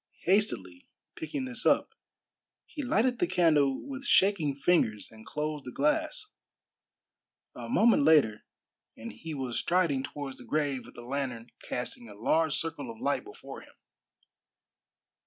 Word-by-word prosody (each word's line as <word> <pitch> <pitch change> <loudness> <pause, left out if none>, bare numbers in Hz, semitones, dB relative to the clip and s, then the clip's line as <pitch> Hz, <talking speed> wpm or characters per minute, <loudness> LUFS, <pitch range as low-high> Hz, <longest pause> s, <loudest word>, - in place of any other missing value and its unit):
Hastily 165 - 0 0.3
picking 160 - -4
this 250 -1 -2
up, - - +3 0.7
he 300 - -7
lighted 245 -1 +1
the 175 - +2
candle 160 - +2
with 270 -1 -6
shaking 190 - +3
fingers 140 - +1
and 110 0 -15
closed 150 -1 -3
the 125 - -7
glass. 300 - 0 1.3
A - - -8
moment 235 - +4
later, 140 -8 +4 0.5
and 115 0 -7
he 155 +8 -7
was 130 -4 -2
striding 170 -7 +1
towards 135 -1 -6
the - - -10
grave 145 -4 -1
with - - -15
the 120 - -9
lantern 125 -3 -4
casting 120 -1 -5
a 105 - -11
large 155 +8 +2
circle 165 +9 -3
of 225 -1 -9
light 255 - 0
before 410 +1 -10
him. - - -18
150 Hz, 140 wpm, -29 LUFS, 130-205 Hz, 1.3 s, moment